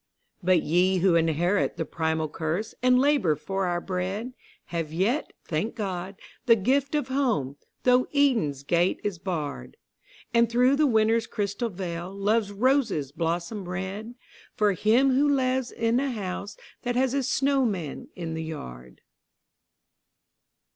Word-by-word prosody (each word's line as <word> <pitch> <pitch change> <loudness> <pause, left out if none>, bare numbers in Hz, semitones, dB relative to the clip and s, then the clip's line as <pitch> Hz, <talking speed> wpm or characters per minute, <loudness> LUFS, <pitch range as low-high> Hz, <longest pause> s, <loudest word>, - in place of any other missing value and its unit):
But 180 -2 +3
we 180 +4 +2
who 185 0 +3
inherit 170 +4 +1
the - - -2
primal 160 -1 -1
curse, 165 +8 -3
and 250 0 +5
labour 270 - +3
for 195 +5 -2
our 175 0 0
bread, 190 +7 -3 0.4
Have 165 -3 -2
yet, 205 - 0
thank 170 +9 -2
God, 190 -3 -4 0.3
the 230 - +8
gift 270 +7 +1
of 290 -3 -1
Home, 235 - 0 0.3
though 250 0 +4
Eden's 230 - +2
gate 170 +5 +1
is 205 -5 -3
barred: 150 - -4 0.6
And 235 -1 +4
through 250 +3 +4
the 305 0 +4
Winter's 225 -1 +2
crystal 205 +3 -2
veil, 175 -2 -5
Love's 205 +1 +1
roses 220 - +1
blossom 175 +4 -3
red, 195 +6 -5 0.4
For 210 -2 +3
him 235 +8 +3
who 285 +3 +3
lives 260 -2 +1
in 230 +1 +1
a 275 0 0
house 200 -2 -5 0.2
that 245 0 -2
has 260 0 +2
a 280 - +1
snowman 255 - 0
in 165 -2 -5
the 160 0 -3
yard. 65 - -8
200 Hz, 140 wpm, -26 LUFS, 170-245 Hz, 0.6 s, the